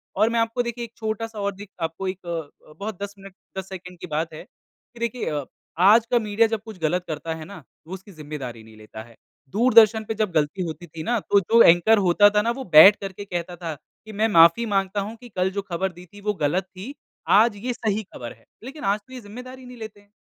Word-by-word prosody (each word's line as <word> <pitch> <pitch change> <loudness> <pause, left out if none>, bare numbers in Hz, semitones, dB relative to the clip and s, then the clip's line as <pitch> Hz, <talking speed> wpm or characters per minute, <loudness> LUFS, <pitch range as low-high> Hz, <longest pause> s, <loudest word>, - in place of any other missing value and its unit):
और 220 - +3
मैं 230 0 0
आपको 230 +2 0
देखिए 235 0 -5
एक 230 - -16
छोटा-सा 220 0 -4
और 200 0 -1
दिक 200 0 -11
आपको 165 +4 -3
एक 185 0 -5
अ, 165 -4 -6
अ, - - -15
बहुत 200 -1 -6
10 200 0 -6
मिनट 195 -1 -12 0.2
10, 190 0 -5
सेकंड 180 -2 -10
की - - -8
बात 160 +1 -3
है 155 - -9
कि 235 - -24
देखिए 235 +1 -2
अ, 145 -2 -3 0.3
आज 210 +5 +6
का 240 - +4
मीडिया 220 +1 +2
जब 225 -2 -3
कुछ 220 -4 -10
गलत 175 +3 0
करता 160 +1 -4
है 160 -1 -8
ना, 200 +3 -10 0.3
तो 165 - -14
उसकी 190 +2 -9
ज़िम्मेदारी 145 -8 -8
नहीं 110 0 -16
लेता 110 0 -10
है। 115 0 -18 0.3
दूरदर्शन 220 - +5
पे - - -1
जब 215 -3 -1
गलती 160 +4 0
होती 170 +1 -7
थी 160 +1 -8
ना 240 +7 0
तो 200 0 +3
जो 225 +5 +4
एंकर 175 +7 +6
होता 190 +3 +5
था 210 0 +2
ना 230 +2 0
वो - - -4
बैठकर 195 +5 +8
कहता 175 -3 -5
था 170 -2 -5 0.3
कि 220 - -9
मैं 220 - +4
माफ़ी 170 +3 +6
माँगता 200 -1 0
हूँ 220 - -8
कि 245 - -12
कल 185 -2 0
जो 200 +1 -3
ख़बर 185 +3 -1
दी 175 +1 -13
थी 205 - -12
वो 210 - +2
गलत 175 +6 +1
थी, 190 +8 -10 0.3
आज 215 +2 +5
ये 250 - 0
सही 220 -2 -2
ख़बर 120 - -9
है 115 - -26 0.2
लेकिन 275 +5 -9
आज 210 - -3
तो 255 +5 -18
ये 255 - -8
ज़िम्मेदारी 250 +5 -10
ही 250 - -12
नहीं 250 0 -11
लेते 220 -2 -9
हैं। 205 - -28
200 Hz, 245 wpm, -23 LUFS, 170-220 Hz, 0.3 s, बैठकर